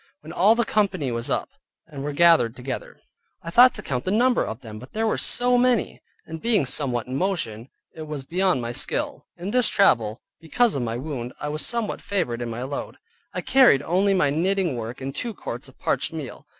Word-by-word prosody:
When 155 +2 -10
all 200 +6 +5
the 235 0 +1
company 195 - 0
was 115 0 -2
come - - +1
up, - - -18 0.4
and 145 -4 -8
were 150 - -2
gathered 155 -7 +4
together, 125 +1 -6 0.4
I 165 - -6
thought 250 +6 +7
to - - -7
count 125 -2 -3
the - - -2
number 240 +5 +3
of 110 +3 -6
them, 110 -3 -9
but 130 - -13
they 220 - -1
were 220 - +1
so 245 0 +4
many, 245 -3 +1 0.2
and 160 0 -8
being 225 - +2
somewhat 130 -3 0
in 130 - -5
motion, 135 - -2 0.2
it 155 -1 -8
was 150 -3 -5
beyond 180 -3 0
my 120 - -3
skill. - - -4
In 180 +4 -5
this 250 -1 +3
travel, 115 - +2 0.2
because 220 +8 +1
of 140 - -2
my 115 -1 -2
wound, 130 -3 -5
I 150 - -3
was 150 +1 -2
somewhat 235 -3 -2
favored 160 -13 -2
in 120 - -3
my 115 +2 -5
load; 140 +2 -5 0.4
I - - -1
carried 250 - +5
only 195 +5 +2
my 145 -6 +2
knitting 180 0 0
work 115 +2 -6
and 135 +1 -4
two 235 - -4
quarts - - -7
of - - -17
parched - - -1
meal. - - -7
155 Hz, 215 wpm, -24 LUFS, 125-200 Hz, 0.4 s, thought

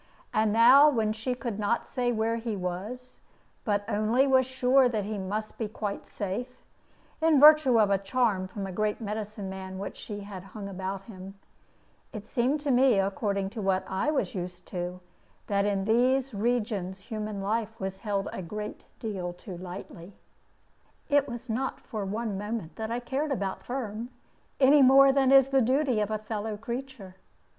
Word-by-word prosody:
And 215 0 +2
now, 250 +7 +7
when 220 -6 0
she 225 +3 -3
could 235 -4 -5
not 210 +3 0
say 245 -2 -1
where 225 0 0
he 230 -2 -3
was, 200 +8 -6 0.4
but 205 -3 0
only 220 +4 +2
was 260 -2 +3
sure 260 0 +3
that 220 -4 -1
he 210 +1 -4
must 210 +3 -4
be 225 - -1
quite 205 -1 -5
safe 240 +6 -5 0.6
(in 320 -3 +5
virtue 300 -5 +7
of 205 -2 +4
a 195 - +3
charm 200 -2 0
from 195 +1 -6
a 190 - -5
great 210 +3 -1
medicine 215 -2 -5
man 190 0 -7
which 200 +1 -5
she 205 -2 -7
had 200 -2 -8
hung 200 +1 -8
about 190 0 -5
him), 195 -2 -10 0.8
it 215 -2 -7
seemed 255 +5 0
to 290 -2 0
me, 250 -3 +5
according 195 0 -1
to 220 -1 -5
what 190 -1 +1
I 190 +10 -1
was 280 -3 0
used 180 -1 -6
to, 180 0 -4 0.4
that 200 -1 +1
in 200 -2 0
these 255 +4 +2
regions 205 -4 -1
human 215 0 -5
life 225 +3 -2
was 190 0 -4
held 200 -1 -2
a - - -4
great 210 +4 -6
deal 190 -6 -4
too 180 +1 -9
lightly. 180 0 -9 1.0
It 285 -1 +3
was 240 +1 -7
not 250 +4 -2
for 215 -3 -5
one 210 0 -3
moment 210 -5 -5
that 220 0 -4
I 235 +1 -1
cared 275 +5 -2
about 200 -7 -2
Firm, 235 -2 -5 0.5
any 280 +2 +6
more 270 +1 +7
than 270 -1 +3
is 270 -1 +7
the 270 -1 +3
duty 260 0 +2
of 210 - -1
a 215 - -1
fellow 215 0 -4
creature. 235 -4 -7
215 Hz, 175 wpm, -28 LUFS, 195-250 Hz, 1.0 s, now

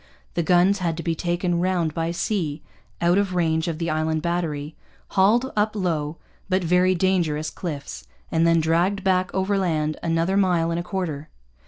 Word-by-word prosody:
The 170 - 0
guns 180 +4 +3
had 170 -3 -1
to 165 - -4
be 165 - 0
taken 175 +1 -1
round 175 -3 0
by 165 0 -1
sea, 170 -4 -2 0.4
out 175 +3 +4
of 195 -3 -1
range 160 -1 +1
of 165 -2 -2
the 165 -1 -2
Island 155 0 -1
Battery, 160 -4 -2 0.3
hauled 225 +7 +3
up 215 +1 +1
low 165 -5 -1 0.3
but 185 0 +1
very 180 +2 +3
dangerous 170 -4 0
cliffs, 140 - -6 0.2
and 165 +1 +3
then 165 0 +4
dragged 175 +5 +1
back 185 -1 +2
overland 185 -6 0
another 165 +3 +1
mile 175 -4 +2
and 165 - -1
a - - -3
quarter. 165 -6 -4
170 Hz, 170 wpm, -23 LUFS, 160-185 Hz, 0.4 s, out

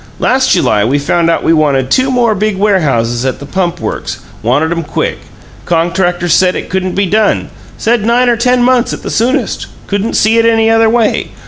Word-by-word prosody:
Last - - +1
July 105 -1 +2
we 130 +6 +1
found 165 +4 0
out 165 - 0
we 165 - +2
wanted 140 -4 +1
two 260 +1 +2
more 245 -3 +2
big 210 0 -1
warehouses 135 - 0
at 130 -1 -2
the 140 - -10
Pump 175 +2 -2
Works - - -4 0.2
wanted 145 +8 0
'em 170 0 -1
quick. 150 - -3 0.5
Contractors 175 0 0
said 185 -1 +3
it - - -6
couldn't 185 -1 -2
be 200 - +1
done; 215 +3 0 0.3
said 230 -1 0
nine 240 +3 +2
or 240 - +3
ten 250 +2 +1
months 250 0 +2
at - - -7
the - - -5
soonest; 240 +4 -1 0.2
couldn't 205 +2 -2
see 225 +2 +3
it 230 - +2
any 225 -1 +2
other 225 0 +3
way. 230 -1 0
190 Hz, 200 wpm, -12 LUFS, 160-225 Hz, 0.5 s, said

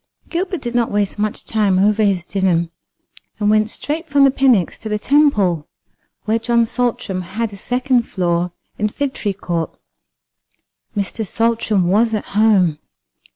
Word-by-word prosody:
Gilbert 360 +1 -2
did 240 -1 -4
not 240 -1 +1
waste 205 0 -1
much 210 0 -2
time 205 -4 +1
over 210 +3 +3
his 190 -4 +1
dinner, 180 -4 +1 0.7
and 210 -1 +2
went 215 0 +3
straight 315 +7 -3
from 280 -1 +4
the 275 - +6
Pnyx 255 -9 +2
to 220 - -6
the 210 - 0
Temple, 210 - +2 0.6
where 220 +1 +1
John 235 0 +2
Saltram 240 -5 -2
had 205 +5 -4
a - - -9
second 250 +2 0
floor 175 -1 0 0.3
in 210 0 +1
Figtree 260 -5 -2
court. 170 -4 -4 1.2
Mr. 205 +2 -2
Saltram 225 -3 0
was 220 +4 +2
at 210 - -5
home. 195 -7 +3
215 Hz, 150 wpm, -19 LUFS, 190-240 Hz, 1.2 s, the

